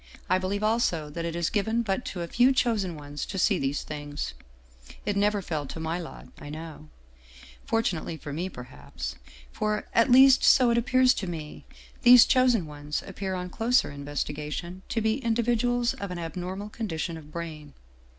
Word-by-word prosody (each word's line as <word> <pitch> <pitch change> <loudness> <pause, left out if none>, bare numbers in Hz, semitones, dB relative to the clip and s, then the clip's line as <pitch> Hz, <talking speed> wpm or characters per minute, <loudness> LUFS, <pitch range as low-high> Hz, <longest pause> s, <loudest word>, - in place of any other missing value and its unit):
I 185 - +4
believe 200 +3 -2
also 215 -9 +1
that 170 +2 -4
it 170 0 -3
is 170 -1 -1
given 220 +3 0
but 200 +2 -2
to 180 - -5
a - - -5
few 245 +8 +4
chosen 220 -9 0
ones 145 0 -6
to 195 - -5
see 185 - +3
these 135 +1 -1
things. 145 -1 -5 0.7
It 205 0 0
never 205 0 +1
fell 155 -5 -3
to 160 - -7
my 160 +2 -2
lot, 170 - -9
I 145 - -9
know. 155 - -9 0.8
Fortunately 180 -8 -1
for 145 -1 -7
me, 175 +5 -3
perhaps. 65 - -8 0.4
For, 210 0 -1
at 230 +3 +4
least 260 +1 +7
so 250 -3 +6
it 235 - +2
appears 255 +2 +4
to 195 - -4
me, 155 -3 -7 0.4
these 250 -1 +9
chosen 250 -7 +3
ones 150 0 -5
appear 195 -1 -4
on 180 0 -5
closer 235 - +2
in 140 0 -8
vestigation 150 +5 -4
to 225 - -1
be 220 +4 +1
individuals 240 +1 +1
of 200 - -6
an 180 - -5
abnormal 180 +4 -5
condition 175 -7 -4
of 155 -2 -11
brain. 155 -3 -7
185 Hz, 180 wpm, -27 LUFS, 155-225 Hz, 0.8 s, these